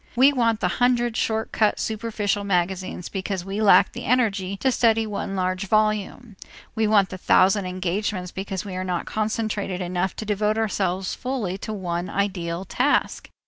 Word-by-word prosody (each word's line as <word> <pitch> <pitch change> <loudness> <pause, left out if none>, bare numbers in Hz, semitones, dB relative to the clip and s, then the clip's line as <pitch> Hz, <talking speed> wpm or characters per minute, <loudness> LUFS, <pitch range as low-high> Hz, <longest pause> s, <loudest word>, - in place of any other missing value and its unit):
We 270 +4 +6
want 230 -4 +1
the - - +2
hundred 240 -2 +2
short 220 0 -1
cut 215 -2 +2
superficial 210 -2 -2
magazines 185 -1 -1
because 190 -1 -4
we 195 +2 -3
lack 195 -4 +6
the - - -7
energy 200 -6 +1
to 265 +6 +1
study 225 -2 +3
one 200 -2 -4
large 185 +1 -1
volume; 215 +1 0 0.4
we 220 -1 +1
want 205 -3 +4
the 185 - -7
thousand 190 +1 +3
engagements 185 0 -2
because 190 0 -5
we 195 - -6
are 185 - -2
not 180 -2 -2
concentrated 215 -3 -2
enough 180 +1 -2
to 220 - -6
devote 210 +1 0
ourselves 190 -4 -1
fully 250 -8 -3
to 215 - -5
one 180 -3 -3
ideal 185 -3 -2
task. - - 0
200 Hz, 165 wpm, -24 LUFS, 185-220 Hz, 0.4 s, We